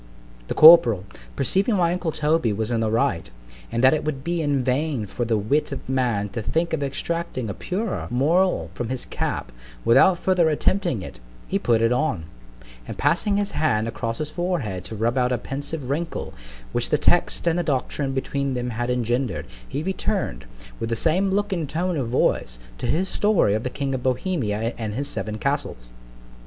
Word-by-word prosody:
The - - -3
corporal, 125 - +8 0.3
perceiving 200 - +2
my 175 -2 +2
uncle 180 -2 -2
Toby 150 -5 +1
was 110 +3 -2
in 115 - +1
the 110 -1 +1
right, 110 -6 0 0.4
and 115 - -1
that 130 - +7
it 155 - 0
would 140 -3 -3
be 170 +1 -1
in 145 -3 +1
vain 135 -2 0
for 120 +4 -3
the 115 -1 +1
wit 125 +9 0
of - - -6
man 120 -6 0
to 105 +4 -4
think 165 +10 -1
of 160 - 0
extracting 140 - -3
a - - -4
purer 200 - -3
moral 165 +10 +2
from 120 -2 -4
his 130 -1 -2
cap, - - -3 0.3
without 135 +10 +6
further 180 -2 +2
attempting 160 - 0
it, - - -9 0.3
he - - 0
put 115 -1 +2
it 115 - +3
on; 125 - 0 0.6
and - - -6
passing 200 +4 +2
his 205 -1 -1
hand 110 -8 +1
across 115 0 -3
his 155 0 -4
forehead 165 - -2
to 110 - -6
rub 115 +4 0
out 125 0 +1
a 125 - +1
pensive 140 +3 -5
wrinkle, 160 +5 -3 0.4
which - - -1
the - - +3
text - - +2
and 170 0 +2
the - - +2
doctrine 140 -2 -1
between 135 0 -2
them 125 0 -2
had 120 +2 -2
engender'd, 125 +1 -1 0.2
he 145 +3 -3
return'd, 190 - -2 0.3
with 115 - -3
the 115 - 0
same 175 - +1
look 205 +1 0
and 165 -6 -2
tone 180 +3 -1
of 135 -6 -1
voice, - - +1 0.2
to - - -2
his 180 +5 +1
story 205 - +2
of 110 - 0
the 125 - -3
king 135 +1 -3
of 130 - -2
Bohemia 125 - -1
and 110 -2 -3
his 140 +3 -2
seven 110 -6 -4
castles. 140 - -3
135 Hz, 195 wpm, -23 LUFS, 115-170 Hz, 0.6 s, corporal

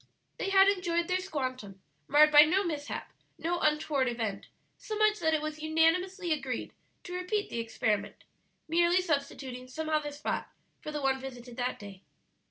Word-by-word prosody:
They 390 - -1
had 390 0 +6
enjoyed 345 -4 +1
their 365 0 +1
"squantum," 255 - -4 0.3
marred 300 +2 +6
by 295 0 +10
no 355 +6 +4
mishap, 300 -5 -4 0.2
no 345 +1 -1
untoward 300 -3 +1
event, 220 -4 -3 0.3
so 430 - -6
much 430 0 +3
that 320 0 +2
it 305 - -2
was 310 0 -5
unanimously 330 +3 +2
agreed 265 -5 -4 0.3
to 355 - -8
repeat 365 +4 -2
the 235 - -2
experiment, 220 -2 -2 0.4
merely 345 +2 +3
substituting 280 -6 -3
some 315 +5 -5
other 305 -1 0
spot 290 +1 -3 0.3
for 305 - -6
the 295 -2 -4
one 265 0 +2
visited 245 -2 -9
that 250 0 -1
day. 200 -2 -11
305 Hz, 165 wpm, -30 LUFS, 260-350 Hz, 0.4 s, by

